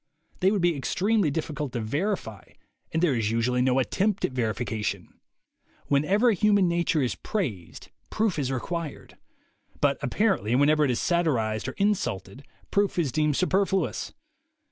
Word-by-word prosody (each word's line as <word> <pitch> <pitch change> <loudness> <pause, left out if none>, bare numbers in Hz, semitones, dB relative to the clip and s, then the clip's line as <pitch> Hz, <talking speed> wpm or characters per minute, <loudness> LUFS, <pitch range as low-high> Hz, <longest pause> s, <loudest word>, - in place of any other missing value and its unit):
They 185 - +4
would 200 -3 0
be 175 -2 +3
extremely 195 - +1
difficult 150 -2 -3
to 120 - -2
verify, 115 - -3 0.4
and 160 +2 0
there 160 -6 +3
is 115 -4 0
usually 120 +2 +1
no 130 0 +2
attempt 195 - +1
at - - -3
verification. 110 -5 -3 0.7
Whenever 190 - +3
human 205 -2 +3
nature 170 -3 +1
is 125 - 0
praised, 110 - -5 0.2
proof 215 -7 0
is 135 -2 -1
re 130 - -1
quired; 170 -2 -6 0.6
but 140 -1 +2
apparently 145 - +1
whenever 150 +3 +4
it 145 - +2
is 125 - 0
satirized 125 -11 0
or - - -4
insulted, 140 - -1 0.3
proof 200 -1 +1
is 155 -7 +1
deemed 150 0 +1
superfluous. 190 0 0
150 Hz, 145 wpm, -26 LUFS, 125-190 Hz, 0.7 s, They